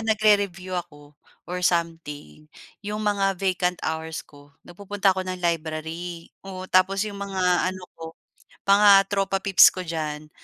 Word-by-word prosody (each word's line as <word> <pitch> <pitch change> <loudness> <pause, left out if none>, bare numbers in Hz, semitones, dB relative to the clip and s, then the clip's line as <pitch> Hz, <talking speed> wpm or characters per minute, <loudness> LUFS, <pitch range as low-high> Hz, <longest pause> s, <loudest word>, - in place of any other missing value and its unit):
nagre-review 205 -4 +1
ako 145 -4 -17 0.3
or 180 +1 -5
something, 165 -4 -3 0.3
'yong 210 +1 -5
mga 195 -2 +1
vacant 180 -1 0
hours 160 0 -4
ko 145 -1 -19
nagpupunta 200 +2 -1
ako 190 - -3
ng 185 0 -5
library, 165 +1 -4
oo. 185 -1 -8
Tapos 190 +2 +3
'yong 200 -1 -7
mga 185 -2 +1
ano 185 -1 -7 0.2
ko 165 0 -9 0.5
mga 205 +1 +6 0.2
tropa 195 -1 -1
pips 195 -2 +6
ko 185 - -5
diyan, 155 -3 -5
180 Hz, 140 wpm, -24 LUFS, 165-195 Hz, 0.5 s, mga